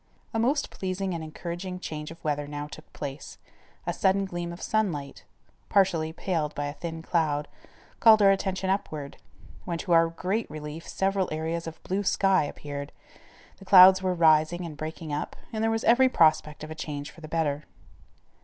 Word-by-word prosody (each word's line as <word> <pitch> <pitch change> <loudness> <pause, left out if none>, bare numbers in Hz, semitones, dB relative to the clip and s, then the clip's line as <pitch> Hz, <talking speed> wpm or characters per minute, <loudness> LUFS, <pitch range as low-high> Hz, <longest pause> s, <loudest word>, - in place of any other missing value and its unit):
A 225 - 0
most 275 +6 +1
pleasing 190 0 -3
and 165 -1 -4
encouraging 175 +3 -6
change 150 -3 -6
of 165 +1 -12
weather 145 -1 -1
now 145 0 -5
took 150 - -12
place. 140 -1 -7 0.5
A - - -1
sudden 195 +1 +2
gleam 175 -2 -4
of 170 - -9
sunlight, 170 -11 -2 0.4
partially 175 -5 +2
paled 160 -3 -2
by 145 - -2
a 145 - -4
thin 160 +2 -6
cloud, 150 -4 0 0.5
called 220 -1 +7
our 195 - +7
attention 190 -1 -1
upward, 155 -7 -3 0.5
when 170 -2 -3
to 175 - -5
our 165 0 +6
great 185 +7 -2
relief 150 +1 -7
several 195 -1 0
areas 160 +2 -3
of 160 - -9
blue 190 +2 -1
sky 195 -3 +3
appeared, 145 -1 -6 0.7
the 195 - -14
clouds 190 0 +9
were 185 -1 0
rising 160 +1 +3
and 160 -3 -7
breaking 155 +1 -6
up, 145 - -3 0.2
and 220 0 -1
there 225 - +3
was 225 0 -1
every 260 +3 +5
prospect 155 - +2
of 155 - -7
a - - -3
change 150 -2 -6
for 165 - -16
the 155 - -8
better. 155 -2 -1
165 Hz, 180 wpm, -27 LUFS, 155-190 Hz, 0.7 s, clouds